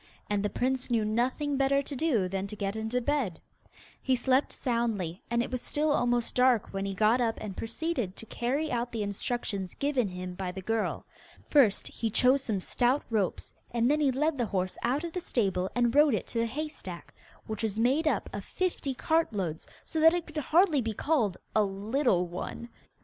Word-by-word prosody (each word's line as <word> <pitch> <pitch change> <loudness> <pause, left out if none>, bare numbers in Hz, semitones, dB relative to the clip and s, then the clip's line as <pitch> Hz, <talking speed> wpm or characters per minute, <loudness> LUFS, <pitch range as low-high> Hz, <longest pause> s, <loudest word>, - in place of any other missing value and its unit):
And 205 -1 +2
the 205 - 0
prince 260 +3 -1
knew 230 -3 +2
nothing 255 +6 0
better 275 +1 +3
to 280 - -5
do 245 - +1
than 195 +1 -3
to 210 - -7
get 200 0 -2
into 220 +3 -1
bed. 250 - -1 0.6
He 260 - +2
slept 260 +2 +2
soundly, 225 - -1
and 235 0 +2
it - - -6
was 255 -1 -2
still 300 +1 0
almost 245 -4 +1
dark 250 -5 +3
when 195 0 -2
he 195 - -3
got 220 +5 +3
up 230 -2 0
and 205 -3 -6
proceeded 235 - -2
to - - -7
carry 270 +8 -1
out 240 0 -1
the 225 -2 -2
instructions 200 -2 -3
given 275 -5 +1
him 180 -1 -6
by 180 0 -4
the 190 - -6
girl. 225 +2 -1 0.4
First 250 -9 +4
he 225 - -3
chose 255 +5 +4
some 205 -6 -1
stout 250 +8 +1
ropes, 205 -5 -1 0.2
and 235 +2 +2
then 300 - +2
he 285 -3 +3
led 290 +2 0
the 240 - +1
horse 185 -2 -1
out 265 +6 0
of 340 -1 -5
the 360 - -2
stable 190 - 0
and 240 -1 +2
rode 290 -4 +5
it 195 - -3
to 230 - -2
the 230 - +1
hay 300 +7 -3
stack, 180 - -9 0.3
which 220 0 -5
was 220 -1 -1
made 270 +7 +2
up - - +1
of - - -4
fifty 340 -7 -2
cartloads, 205 - 0 0.2
so 320 - -3
that 325 +2 +7
it 345 -1 -2
could 310 -1 -10
hardly 315 0 +3
be 225 -1 -2
called 230 - +1 0.2
'a 215 - +5
little 200 0 +1
one. 180 +7 -6
235 Hz, 205 wpm, -29 LUFS, 205-280 Hz, 0.6 s, that